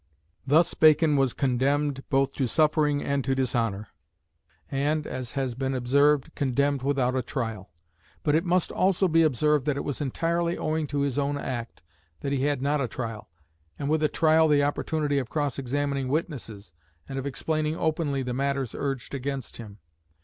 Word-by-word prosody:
Thus 160 +5 +4
Bacon 155 -1 +5
was 135 -2 +2
condemned 135 +2 +1
both 135 0 +2
to 130 - -1
suffering 150 +1 +2
and 140 -1 0
to 135 0 0
dishonour; 115 -6 -1 0.8
and, 150 +3 0
as 125 -2 -5
has 135 -3 -1
been 135 +2 -2
observed, 140 +3 +2
condemned 140 0 0
without 130 -2 +1
a 130 - +1
trial. 115 -6 -4 0.5
But 145 - +2
it 160 +2 +3
must 180 -1 +1
also 190 0 +2
be 165 -1 +4
observed 150 -1 +2
that 145 -2 +1
it - - -2
was 145 +1 -4
entirely 170 +5 -1
owing 155 -1 -1
to 145 0 -2
his 140 -1 0
own 145 0 0
act 120 -8 -5 0.4
that 140 - -3
he 140 -1 0
had 145 -3 0
not 145 +1 +1
a 130 - 0
trial, 115 -5 -6 0.5
and 140 - -3
with 155 0 +2
a 155 - +4
trial 160 0 +4
the 145 -2 +4
opportunity 145 0 0
of 130 -3 -5
cross 145 -4 -1
examining 140 +1 -1
witnesses 125 - -4 0.3
and 135 0 -4
of 135 - -4
explaining 155 +3 -1
openly 155 -4 0
the 125 -1 -3
matters 140 -1 -1
urged 135 -3 -4
against 135 -1 -4
him. 105 -3 -10
140 Hz, 175 wpm, -26 LUFS, 130-150 Hz, 0.8 s, Bacon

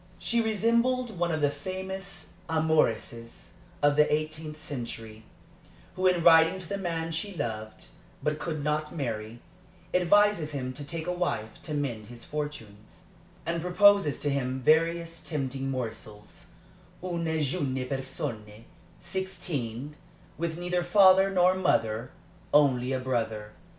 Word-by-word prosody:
She 235 0 +1
resembled 230 0 +1
one 175 -1 +1
of 155 -1 -1
the 145 -1 +3
famous 190 +3 -6 0.2
amoureuses 150 -8 0 0.3
of 145 0 +5
the 150 0 +5
eighteenth 155 0 -2
century, 115 -6 -7 0.7
who 185 0 +2
in 180 -2 +2
writing 165 +2 +7
to 185 -3 -6
the 200 +3 -3
man 165 -3 -2
she 185 +5 -3
loved 110 -7 -5 0.4
but 150 0 0
could 155 -3 -3
not 150 +2 -1
marry, 115 -5 -4 0.5
advises 180 -3 +3
him 130 -2 -3
to 145 - -7
take 160 +3 -4
a 180 - -1
wife 140 -12 -3
to 155 -3 -4
mend 120 -7 -3
his 120 0 -11
fortunes, 145 -9 -7 0.4
and 170 0 -1
proposes 180 -3 +5
to 145 - +1
him 130 -1 -1
various 165 +3 +2
tempting 135 -3 -3
morsels 110 -5 -6 0.6
une 170 -3 -1
jeune 135 -3 -1
personne, 115 -5 -5 0.3
sixteen, 150 -8 -4 0.4
with 170 0 -3
neither 180 0 -1
father 190 +1 +6
nor 185 -1 +4
mother, 115 -10 +1 0.4
only 135 -4 +4
a 130 - 0
brother. 110 -4 -2
150 Hz, 130 wpm, -28 LUFS, 130-180 Hz, 0.7 s, writing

